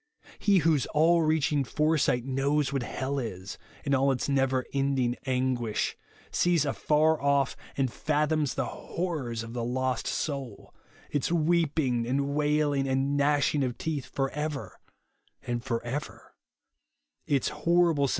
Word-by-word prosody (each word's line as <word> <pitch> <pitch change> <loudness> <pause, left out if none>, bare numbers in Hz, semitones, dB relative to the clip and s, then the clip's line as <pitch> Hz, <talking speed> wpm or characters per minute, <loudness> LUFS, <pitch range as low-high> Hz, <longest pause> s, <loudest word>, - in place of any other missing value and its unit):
He 200 -2 +4
whose 155 -5 +3
all 165 +3 +5
reaching 155 -2 +2
foresight 150 -3 +1
knows 140 +1 0
what 135 - 0
hell 135 +3 -3
is, 95 -6 -6 0.3
in 140 - +1
all 135 +1 +3
its 130 - -1
never 135 -2 +1
ending 135 -3 +1
anguish, 125 -4 0 0.4
sees 175 -4 +2
afar 155 +2 +2
ojff, 140 -1 +2 0.2
and 130 -3 0
fathoms 150 -1 0
the - - 0
horrors 140 -11 -4
of 115 0 -8
the 120 -1 -3
lost 130 +1 -1
soul, 135 -7 -4 0.4
its 145 +2 0
weeping 155 -7 +1
and 140 +2 0
wailing 145 -2 +1
and 135 +2 +1
gnashing 145 0 +2
of 125 -2 -2
teeth 155 -5 -3
for 135 -1 -2
ever 150 - -4 0.6
and 120 -1 -3
for 115 -3 -2
ever; 140 +5 -6 0.9
its 140 -3 +1
horrible 165 -2 +2
sen. - - -3
140 Hz, 140 wpm, -28 LUFS, 130-150 Hz, 0.9 s, all